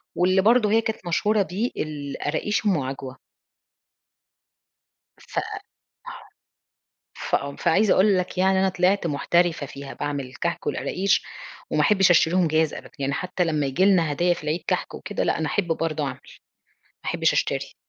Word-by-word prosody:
واللي 185 +2 +3
برضو 225 +1 +4
هي 225 +2 +4
كانت 220 -5 -4
مشهورة 210 +5 +2
بيه 195 +7 -2
القراقيش 150 +7 -3
أم 190 -5 +3
عجوة. 130 0 -6 2.0
ف - - -12 1.8
فآه، 140 0 -2
فعايزة 190 +5 +3
أقول 195 0 +4
لك 180 0 -3
يعني 190 0 +3
أنا 190 - +3
طلعت 185 0 +1
محترفة 165 +1 +1
فيها، 140 0 -9
باعمل 140 -3 -4
كحك 170 0 -3
والقراقيش، 195 +1 0 0.5
وما - - +1
احبش 195 -3 +4
أشتريهم 175 +1 +4
جاهز 155 0 +1
أبدًا، - - -9
يعني 140 0 -1
حتى 180 +3 -1
لمّا 155 -3 0
ييجي 155 +8 +1
لنا 175 -6 +3
هدايا 175 +4 +2
في 170 - -10
العيد 155 +3 -2
كحك - - -1
وكده، - - -4
لأ، - - +1
أنا 160 - -1
أحب 195 0 -1
برضو 160 -2 -1
أعمل، 130 -2 -4 0.6
ما - - -39
أحبش - - +2
أشتري. - - -1
175 Hz, 150 wpm, -24 LUFS, 150-190 Hz, 2.0 s, برضو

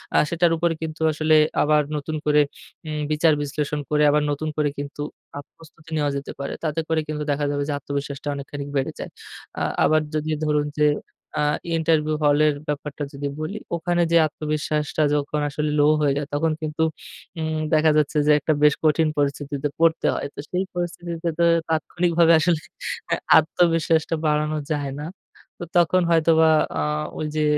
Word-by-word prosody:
আ - - +6
সেটার 170 0 +2
উপরে 170 0 +1
কিন্তু 160 0 -5
আসলে 155 +1 +2 0.3
আবার 150 0 +4 0.2
নতুন 155 +2 -4
করে 150 0 +4 0.5
উম 150 -1 -3
বিচার 155 +1 +4
বিশ্লেষণ 150 +1 -2
করে 150 0 +2
আবার 150 0 +2
নতুন 155 +2 -2
করে 150 -1 +2
কিন্তু 145 +1 -6 0.4
আ - - -3 0.2
প্রস্তুতি 165 0 -17
নেওয়া 145 -1 +1
যেতে 140 - -6
পারে। 140 - -4
তাতে 155 0 -1
করে 160 -1 +2
কিন্তু 150 -1 -3
দেখা 145 +1 0
যাবে 145 0 -1
যে 145 - -1
আত্মবিশ্বাসটা 140 0 -5
অনেকখানিক 140 0 -6
বেড়ে 135 -1 0
যায়। - - -5 0.5
আ - - -3 0.2
আবার 155 0 +4
যদি 155 +1 -2 0.2
ধরুন 150 -1 +1
যে 150 - +5 0.5
আ - - +2 0.3
ইন্টারভিউ 155 -1 +1
হলের 150 0 +4
ব্যাপারটা 150 0 -4
যদি 140 +1 -4
বলি। 170 +7 -4 0.2
ওখানে 175 +1 0
যেয়ে 170 -1 +6
আত্মবিশ্বাসটা 150 0 -2
যখন 145 +1 -1
আসলে 150 +2 -2
লো 145 - +5 0.2
হয়ে 145 -2 +3
যায়, 145 -1 -3
তখন 160 +2 +1
কিন্তু 155 +1 -1 0.6
উম 155 0 -2 0.2
দেখা 155 0 +5
যাচ্ছে 150 0 +1
যে - - +6
একটা 155 - +1
বেশ 150 -1 +6
কঠিন 155 +1 +3
পরিস্থিতিতে 145 0 -1
পড়তে 165 0 +3
হয়। - - -3
তো - - -10
সেই 185 +1 0
পরিস্থিতিতে 175 -1 -4
তো - - +4 0.3
তাৎক্ষণিকভাবে 170 +1 +2
আসলে 165 -1 +2 0.5
হ্যাঁ, - - 0 0.2
আত্মবিশ্বাসটা 165 0 +2
বাড়ানো 150 0 +1
যায় 145 -2 -1
না। 150 - -5 0.5
তো - - -5
তখন 175 +2 +4
হয়তোবা 160 -1 +4 0.3
আ - - +1 0.4
ওই 155 - -2
যে 155 - +1
155 Hz, 170 wpm, -23 LUFS, 145-160 Hz, 0.6 s, আ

